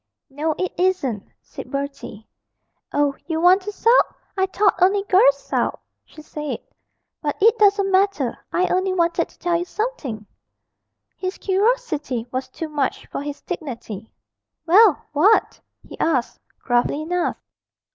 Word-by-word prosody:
'No, 305 +3 -1
it 370 - -2
isn't,' 285 - 0
said - - -10
Bertie. 275 -6 -6 0.6
'Oh, 290 -1 +1
you 320 -2 -1
want 360 +3 +5
to 420 +3 -5
sulk? 460 +4 +3 0.2
I 380 -1 +1
thought 390 -1 +1
only 390 +2 +4
girls 450 +6 +5
sulked,' - - -2 0.3
she 310 - -14
said; 300 -1 -5 0.6
'but 290 -2 -2
it 450 +3 +5
doesn't 400 -1 +4
matter, 375 -9 +2 0.2
I 360 - +2
only 370 +1 +1
wanted 340 -1 +1
to - - -23
tell 350 -1 0
you 345 - -3
something.' 340 - -4 0.9
His 370 0 -4
curiosity 380 - 0
was 260 +1 -3
too 325 - -6
much 290 -3 -2
for - - -3
his 290 0 -6
dignity. 235 - -7 0.5
'Well 380 +1 +5
what?' 380 +10 +3 0.3
he - - -11
asked, 265 -7 0 0.2
gruffly 245 +4 +1
enough. 355 +2 -1
345 Hz, 140 wpm, -22 LUFS, 285-390 Hz, 0.9 s, want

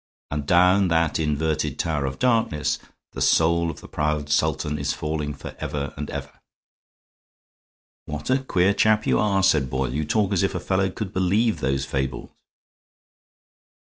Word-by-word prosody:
And 75 -1 -3
down 90 +2 +5
that 80 -2 +1
inverted 75 -1 -1
tower 75 -5 -1
of 65 - -5
darkness 115 -11 +1 0.3
the - - -7
soul 85 +1 +3
of 80 - -7
the - - -11
proud 75 -1 -2
Sultan 75 0 0
is 70 0 -1
falling 75 -1 -3
forever 70 0 -5
and 75 0 -5
ever." - - -7 1.7
"What 75 - -4
a 130 - +3
queer 95 -7 +2
chap 110 +1 +3
you - - +2
are," 100 -2 +2
said 75 -9 +3
Boyle. 65 -1 -2
"You 75 +3 -1
talk 100 +6 +1
as 95 - +2
if 95 - 0
a - - -1
fellow 95 0 0
could 95 +1 -6
believe 100 +5 +1
those 70 +1 -1
fables." 65 -1 -3
80 Hz, 155 wpm, -24 LUFS, 75-95 Hz, 1.7 s, down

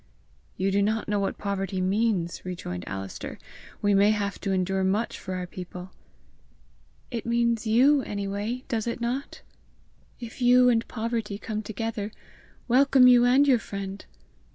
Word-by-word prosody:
"You 195 +1 0
do 200 +1 +2
not 215 +2 0
know 205 -1 0
what 195 - -2
poverty 195 -2 -3
means!" 190 -2 0
rejoined 90 - -6
Alister. 95 0 -6 0.5
"We 205 0 +3
may 200 +1 +5
have 205 -2 -1
to 195 - -2
endure 190 0 0
much 200 +5 0
for 185 -1 -5
our 180 -1 -3
people!" 180 +1 -9 1.2
"It 235 -3 -3
means 235 -1 +1
YOU 265 +6 +5
any 200 -4 -4
way, 210 +6 -3
does 230 -3 -2
it 235 - -3
not? 245 +4 -4 0.8
If 235 +1 -9
you 250 0 +6
and 230 -1 +1
poverty 225 -3 -3
come 215 +1 -4
together, 220 0 -4 0.6
welcome 260 +1 +5
you 245 -1 +7
and 265 +4 +5
your 255 -4 +5
friend! 200 -2 -6
210 Hz, 155 wpm, -26 LUFS, 195-235 Hz, 1.2 s, you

